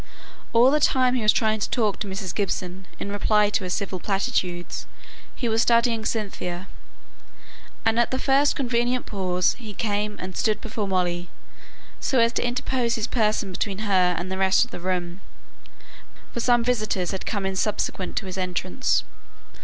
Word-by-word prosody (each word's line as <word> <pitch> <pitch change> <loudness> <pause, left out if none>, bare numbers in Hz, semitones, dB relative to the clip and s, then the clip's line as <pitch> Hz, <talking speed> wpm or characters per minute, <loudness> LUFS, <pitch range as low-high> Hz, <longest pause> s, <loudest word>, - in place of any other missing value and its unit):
All 240 +3 +6
the 300 - +3
time 255 -3 +3
he 255 - 0
was 215 0 +6
trying 220 -1 +1
to - - -1
talk 215 -5 0
to 210 - -3
Mrs. 190 -2 -4
Gibson 185 -2 -3
in 200 - -4
reply 210 0 +3
to 205 - 0
her - - -4
civil 185 0 -2
platitudes, 185 -3 -2 0.5
he 245 - -2
was 225 0 +2
studying 235 -2 +3
Cynthia; 190 -5 -3 1.2
and 225 +1 +3
at 235 - +3
the 260 - -1
first 275 +2 +3
convenient 245 -1 0
pause 180 -3 0
he 215 -4 -8
came 210 -1 -1
and 185 0 -6
stood 215 -1 +1
before 215 -2 -3
Molly, 175 -2 -1 0.7
so 265 - 0
as 230 0 +4
to - - 0
interpose 245 0 0
his 220 - -1
person 215 -5 0
between 200 +3 -3
her 185 -3 +3
and 180 +2 -4
the 190 - -3
rest 190 +4 +4
of 245 - -19
the - - -6
room; 180 0 -2 1.1
for - - -3
some 240 0 +3
visitors 215 -7 0
had 190 - -5
come 205 -3 -1
in 190 0 -1
subsequent 195 -2 -1
to 195 - -1
his 190 0 -5
entrance. 185 +6 0
210 Hz, 175 wpm, -24 LUFS, 185-235 Hz, 1.2 s, All